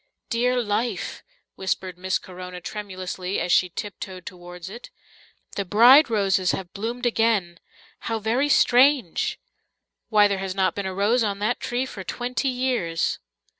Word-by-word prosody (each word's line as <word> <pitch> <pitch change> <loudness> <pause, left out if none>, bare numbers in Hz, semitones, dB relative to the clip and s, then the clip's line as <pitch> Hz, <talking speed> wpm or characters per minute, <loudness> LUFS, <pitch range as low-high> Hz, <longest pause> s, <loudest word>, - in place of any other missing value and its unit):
"Dear 250 +2 +2
life," 225 +3 -2 0.3
whispered 190 -1 -3
Miss 185 +1 -1
Corona 180 0 -9
tremulously, 185 -1 -5
as 180 - -1
she 180 +1 +4
tiptoed 190 -1 -7
towards 175 -1 -9
it. 225 +5 -9 0.7
"The 200 - -1
bride 240 - +7
roses 195 -4 +2
have 180 -2 -5
bloomed 235 +5 -4
again! 220 -7 +1 0.4
How 225 - -2
very 235 +7 0
strange! 255 - +3 0.7
Why, 210 -2 +6
there 200 -1 -1
has 190 -1 -4
not 190 -1 +2
been 200 -1 -3
a 190 - -4
rose 220 +5 +2
on 200 -2 -1
that 215 +4 -1
tree 245 +1 -2
for 200 -7 -8
twenty 250 +7 -2
years." 245 -10 -1
205 Hz, 145 wpm, -24 LUFS, 185-240 Hz, 0.7 s, bride